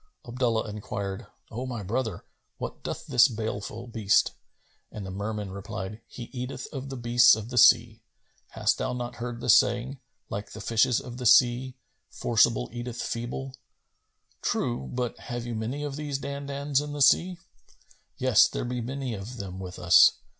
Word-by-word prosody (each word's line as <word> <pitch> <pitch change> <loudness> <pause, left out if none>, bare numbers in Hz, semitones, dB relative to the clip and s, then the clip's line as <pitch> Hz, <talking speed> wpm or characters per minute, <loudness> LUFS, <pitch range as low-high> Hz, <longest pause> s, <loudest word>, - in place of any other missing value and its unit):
Abdullah 120 -2 0
enquired, 100 -2 -5 0.2
"O 125 +4 -4
my 120 -5 -4
brother, 110 -1 -3 0.3
what - - -6
doth - - -5
this 120 +1 +6
baleful 110 -1 -5
beast?"; 110 -4 +2 0.6
and 105 -2 -7
the 95 - -6
Merman 105 0 -4
replied, 105 +1 -6
"He 120 - -8
eateth 125 0 -5
of 135 -1 -5
the 135 - -5
beasts 120 -1 +6
of 110 +2 -7
the 125 - -4
sea. - - +5 0.5
Hast - - 0
thou - - -1
not 120 -1 -5
heard 120 0 -5
the - - -5
saying, 125 +3 +3 0.3
'Like 100 +1 -6
the - - -8
fishes 115 +2 +2
of 120 -1 -9
the 125 -1 0
sea: 125 +1 +4 0.3
forcible - - +2
eateth 120 0 -5
feeble?[FN#262]'" 125 +3 -8
"True; 65 +2 -1
but 125 -2 -3
have 120 -1 -5
you 120 - -4
many 115 +7 -3
of 145 -1 -4
these 145 -2 -3
Dandans 140 0 -2
in 150 0 -6
the 145 - -4
sea?" 175 +6 +4 0.8
"Yes, 130 -4 +5
there - - -4
be 125 0 -3
many 130 +1 -4
of 110 +5 -7
them 95 -3 -6
with 90 -1 -7
us. 90 0 +7
120 Hz, 165 wpm, -27 LUFS, 105-130 Hz, 0.8 s, us